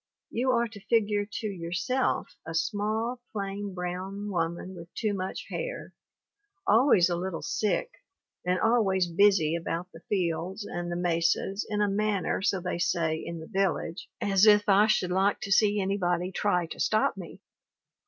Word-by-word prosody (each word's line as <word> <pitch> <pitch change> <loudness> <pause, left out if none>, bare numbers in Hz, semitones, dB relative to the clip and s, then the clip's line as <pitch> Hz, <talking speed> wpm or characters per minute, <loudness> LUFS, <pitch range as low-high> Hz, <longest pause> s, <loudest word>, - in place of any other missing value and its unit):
You 250 +3 0
are 235 -2 +3
to 215 -2 -11
figure 210 -3 +2
to 215 - -3
yourself 190 +7 -1
a 165 - -6
small, 215 +8 -1
plain, 200 -1 -4
brown 190 +3 -4
woman 170 +1 -2
with 170 -1 -11
too 215 -3 0
much 190 -1 -4
hair, - - -5 0.7
always 235 - +5
a 175 - 0
little 180 0 -4
sick, 235 - 0 0.5
and 180 +1 +1
always 210 -5 +3
busy 175 -2 +3
about 170 +2 -3
the 165 - -12
fields 185 +1 -1
and 175 -2 -4
the - - -2
mesas 175 +3 0
in 210 -1 +1
a - - +2
manner, 205 -1 0
so 195 -1 +1
they 180 -1 -3
say 165 -2 +1
in 170 +1 -6
the - - -8
village, 190 -4 -1
as 195 +1 +4
if 210 -1 +6
I 205 +1 +5
should 180 -4 +1
like 195 +2 +2
to 200 - -5
see 205 +1 +4
anybody 185 -2 0
try 180 -3 +1
to - - -7
stop 215 0 +2
me. 180 -4 -9
195 Hz, 165 wpm, -28 LUFS, 175-210 Hz, 0.7 s, if